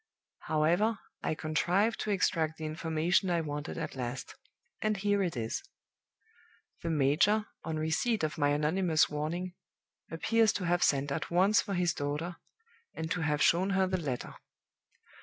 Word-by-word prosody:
However, 175 +8 +2 0.2
I - - -1
contrived 175 +9 +1
to - - -3
extract 160 -5 +1
the 155 - -5
information 160 +4 0
I 170 -1 +2
wanted 150 0 -5
at 165 - -4
last; 125 0 -5 0.5
and 215 -1 +1
here 205 0 +1
it 175 -8 -1
is: 115 -1 -2 1.2
"The 170 - -3
major, 160 +9 +3 0.2
on 160 0 -3
receipt 160 +8 0
of 155 -1 -1
my 145 -2 +2
anonymous 155 +3 +2
warning, 170 +5 -3 0.6
appears 220 +7 +2
to 190 - -3
have 175 +1 +2
sent 140 -2 +2
at 140 0 -2
once 190 +5 +4
for 200 -2 -4
his 175 -1 +2
daughter, 150 +4 -3 0.6
and 160 0 -4
to 175 - 0
have 150 -1 +1
shown 185 +3 +3
her 190 - +4
the 185 -1 -1
letter. 130 -5 -4
165 Hz, 155 wpm, -31 LUFS, 150-190 Hz, 1.2 s, once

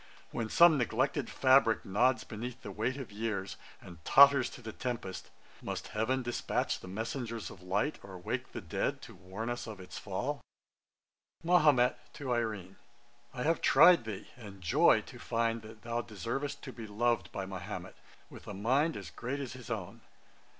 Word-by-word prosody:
When 115 -2 -3
some 170 0 +6
neglected 120 - 0
fabrick 130 -4 +4
nods 125 +7 +2
beneath 120 +3 -7
The 100 - -6
weight 115 +7 -1
of 130 -6 -7
years, 105 -2 -3 0.2
and 85 -3 -13
totters 140 -2 +7
to - - -11
the 110 - -5
tempest, 120 -7 -5 0.3
Must - - -5
heaven 125 +5 0
despatch 120 0 -1
the - - -11
messengers 115 +3 -4
of 90 - -13
light, 100 +11 -1
Or 95 -1 -10
wake 120 +8 -4
the - - -6
dead, 85 - -2
to - - -10
warn 95 +5 -7
us 120 0 -3
of 110 -3 -7
its 90 - -8
fall?' - - -3 1.0
MAHOMET 150 -8 +4
(to 135 -3 -5
IRENE). 105 -6 -3 0.6
'I 125 - -2
have 165 +2 +1
tried 175 -9 +7
thee, 105 -4 -6
and 105 -5 -11
joy 85 -3 +4
to - - -12
find 115 0 0
that 110 0 -13
thou 120 0 -1
deservest 120 +6 -4
to 130 - -7
be 115 -2 -8
loved 110 -3 0
by 95 - -4
Mahomet, 95 -1 -6 0.3
with - - -13
a 100 - -6
mind 135 +11 +1 0.2
great 130 +4 -3
as 130 -4 -5
his 125 -2 -10
own. 105 -7 -5
115 Hz, 170 wpm, -32 LUFS, 100-130 Hz, 1.0 s, totters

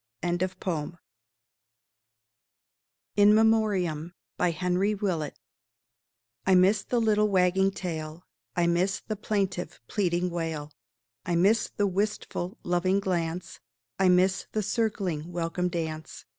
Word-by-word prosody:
WILLIAM 175 0 0
WATSON. 180 -3 -3 2.2
IN 205 +1 +7
MEMORIAM 200 -8 +2 0.3
I 180 -1 0 1.2
miss 195 +3 +4
the 245 - 0
little 210 -2 +3
wagging 190 0 +3
tail; 165 -3 -5 0.3
I 175 - +2
miss 180 +3 +1
the 215 - -2
plaintive, 195 -3 -2
pleading 180 -3 0
wail; 160 -3 -3 0.5
I 175 - -1
miss 200 +6 +3
the 205 - 0
wistful, 200 0 -2
loving 180 +2 +1
glance; 175 -2 -2 0.4
I 190 -1 +5
miss 185 +1 +3
the 215 - -1
circling 190 -8 -1
welcome 175 +1 -1
dance. 160 -2 -5
180 Hz, 105 wpm, -27 LUFS, 170-200 Hz, 2.2 s, IN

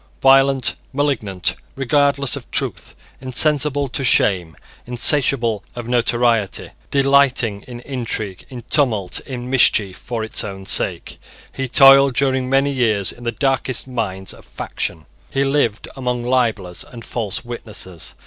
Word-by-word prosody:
Violent, 135 -1 +4 0.2
malignant, 110 -11 -1 0.2
regardless 140 0 +1
of - - -9
truth, - - -1 0.3
insensible 145 +2 +2
to 135 - -2
shame, 90 - +2 0.3
insatiable 120 -3 +3
of 120 -1 -7
notoriety, 120 -3 0 0.2
delighting 135 -6 +2
in 120 -1 -9
intrigue, 115 -7 -5
in 125 -3 -9
tumult, 115 - +1
in 125 -3 -6
mischief 110 -7 +4
for 115 -3 -5
its 110 - 0
own 95 -2 -8
sake, - - 0 0.3
he 135 0 -4
toiled 135 0 +6
during 130 -1 0
many 135 +1 +2
years 110 -8 0
in 120 - -13
the 120 - -1
darkest 135 -1 -1
mines 100 -7 -4
of - - -16
faction. 80 - -5 0.2
He 135 - 0
lived 135 -6 0
among 125 -2 -3
libellers 115 -8 -1
and 120 -5 -12
false 115 -1 -4
witnesses. 110 -7 -7
125 Hz, 130 wpm, -19 LUFS, 110-135 Hz, 0.3 s, toiled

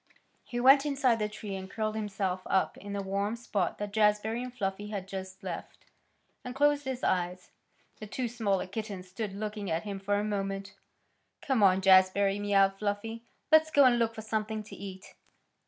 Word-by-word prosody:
He 240 - -4
went 270 +3 +7
inside 270 -5 +2
the 210 0 -1
tree 210 -1 -7
and 190 0 -7
curled 215 +1 -2
himself 195 -3 -2
up 190 - +1
in 200 +1 -8
the 200 -1 -2
warm 200 +3 -1
spot 205 -6 -2
that 205 -1 -5
Jazbury 215 +2 +2
and 250 0 -5
Fluffy 205 -3 -3
had 200 -3 -5
just 190 0 -7
left, 180 -3 -7 0.6
and 250 -1 -6
closed 290 0 +3
his 260 -1 -4
eyes. 180 0 -1 0.5
The 215 - -7
two 250 +4 -2
smaller 220 -5 0
kittens 195 -1 -6
stood 195 +1 -4
looking 210 -1 -4
at 160 +1 -1
him 200 -2 -5
for 200 +1 0
a 205 - 0
moment. 195 -2 -3 0.7
"Come 265 -5 +1
on, 190 -1 +5
Jazbury!" 195 +1 +5
mewed 195 -1 +3
Fluffy. 215 +2 -3 0.3
"Let's 315 0 +6
go 285 -3 +6
and 240 -2 +5
look 230 -1 +1
for 220 - -7
something 215 0 -2
to 210 - -11
eat." 190 -1 -9
205 Hz, 185 wpm, -30 LUFS, 195-225 Hz, 0.7 s, went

